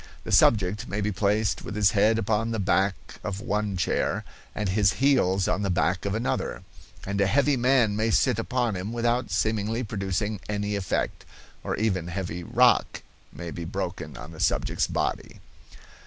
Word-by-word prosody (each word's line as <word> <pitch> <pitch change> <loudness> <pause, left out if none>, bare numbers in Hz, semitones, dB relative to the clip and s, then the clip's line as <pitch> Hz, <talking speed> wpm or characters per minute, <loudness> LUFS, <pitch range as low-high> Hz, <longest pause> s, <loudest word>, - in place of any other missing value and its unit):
The - - -6
subject 105 -1 +3
may 105 - -3
be 105 +1 0
placed 105 +2 0
with - - -6
his 100 -3 +4
head 105 +3 +3
upon 110 +1 0
the 115 - -2
back 95 0 0
of 100 -1 -3
one 105 -2 -2
chair 90 - 0 0.3
and 105 - -2
his 100 +1 +3
heels 100 -9 +2
on - - 0
the 100 - -1
back 90 0 0
of 100 +1 -1
another, 115 - -2 0.4
and 100 0 -1
a 100 - +3
heavy 140 +6 +3
man 120 -4 +3
may 110 +2 +1
sit 110 - +2
upon 120 -2 -1
him 95 +5 -4
without 120 +1 0
seemingly 110 +2 0
producing 105 0 -2
any 105 0 -1
effect, 95 -4 -2 0.4
or - - -2
even 95 -6 -1
heavy 90 -1 -4
rock - - +3 0.3
may 85 -1 -7
be 85 - -6
broken 85 -6 -5
on 75 - -9
the 80 - -12
subject's - - +1
body. - - -3
105 Hz, 170 wpm, -26 LUFS, 95-110 Hz, 0.4 s, his